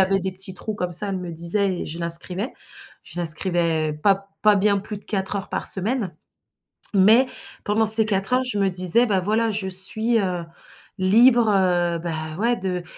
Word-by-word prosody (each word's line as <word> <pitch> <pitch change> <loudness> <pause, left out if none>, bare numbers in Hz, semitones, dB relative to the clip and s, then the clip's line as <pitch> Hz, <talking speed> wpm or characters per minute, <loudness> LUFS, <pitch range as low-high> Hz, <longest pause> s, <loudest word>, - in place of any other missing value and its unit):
avait 195 +1 +2
des 190 0 -4
petits 190 0 -7
trous 215 +3 -5
comme 180 -3 -4
ça, 200 +4 +3
elle 190 - -3
me 180 -1 -7
disait 175 +3 -2
et - - -7
je 165 +3 -8
l'inscrivais. 175 +6 -3 0.5
Je 175 - -8
l'inscrivais 165 -1 +1
pas 195 +6 0 0.2
pas 210 -1 +4
bien 200 0 +1
plus 210 +1 -8
de - - -23
4 195 0 -3
heures 195 - -6
par - - -4
semaine, 200 -1 +1 0.8
mais 220 +7 +4 0.4
pendant 215 +2 0
ces 220 0 +8
4 195 +2 -2
heures, 255 +1 +2
je 250 -5 -4
me 195 - +1
disais: 185 +6 +2
«Bah 195 -4 -1
voilà, 220 +4 -1
je 200 -2 -4
suis, 220 +5 +3
heu, 180 -4 -3 0.5
libre, 230 +5 +4
heu, 175 -3 0
ben, 160 -1 -6
ouais, 235 +3 0
de 180 -2 -4
190 Hz, 190 wpm, -21 LUFS, 175-215 Hz, 0.8 s, ces